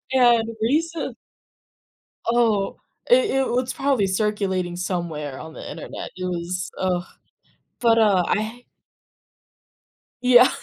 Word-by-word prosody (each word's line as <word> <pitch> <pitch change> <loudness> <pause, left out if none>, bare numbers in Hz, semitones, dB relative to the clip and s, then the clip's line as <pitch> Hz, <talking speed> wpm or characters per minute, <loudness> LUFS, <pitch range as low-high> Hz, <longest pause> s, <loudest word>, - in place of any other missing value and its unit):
And 240 -3 +5
recent 300 +2 0 1.1
Oh, 230 -4 +2 0.3
i - - +8
it 425 - +2
well, 245 - +1
it's 255 0 -3
probably 270 -8 +1
circulating 190 -3 -1
somewhere 170 -6 -3
on 160 0 -9
the - - -8
internet, - - -7
it 185 - -4
was, 180 +1 -3
ugh, 180 -2 0 0.8
but, 230 -1 +4
uh, 205 -5 +4
I 220 +3 -2 1.6
Yeah, 250 0 +7
215 Hz, 115 wpm, -23 LUFS, 185-245 Hz, 1.6 s, i